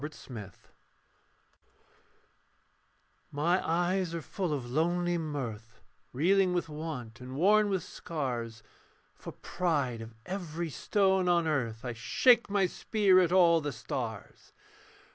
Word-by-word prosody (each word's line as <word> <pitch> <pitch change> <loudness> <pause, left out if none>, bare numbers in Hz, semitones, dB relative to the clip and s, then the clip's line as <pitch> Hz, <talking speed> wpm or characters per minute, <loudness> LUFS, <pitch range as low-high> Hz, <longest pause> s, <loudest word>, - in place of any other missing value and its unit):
THE - - -4
WORLD'S 155 - -15
LOVER 105 -6 -7 2.8
My 170 +6 +1
eyes 175 +1 0
are 165 - -3
full 185 0 -3
of 140 -5 -2
lonely 175 +4 +1
mirth: 120 -8 -5 0.3
Reeling 185 +7 +3
with 175 - -1
want 150 -7 -6
and 130 +1 -8
worn 205 +7 +4
with 190 -3 -1
scars, 120 -8 -5 0.5
For - - -9
pride 145 -10 -2
of 115 0 -10
every 170 -3 -4
stone 190 +2 +1
on 170 -1 +3
earth, 120 -7 -2
I 120 - -3
shake 235 - +3
my 200 -1 +2
spear 195 0 +3
at 175 -2 +2
all 170 -3 +5
the 145 -1 -3
stars. 115 -3 -6
160 Hz, 125 wpm, -30 LUFS, 125-180 Hz, 2.8 s, all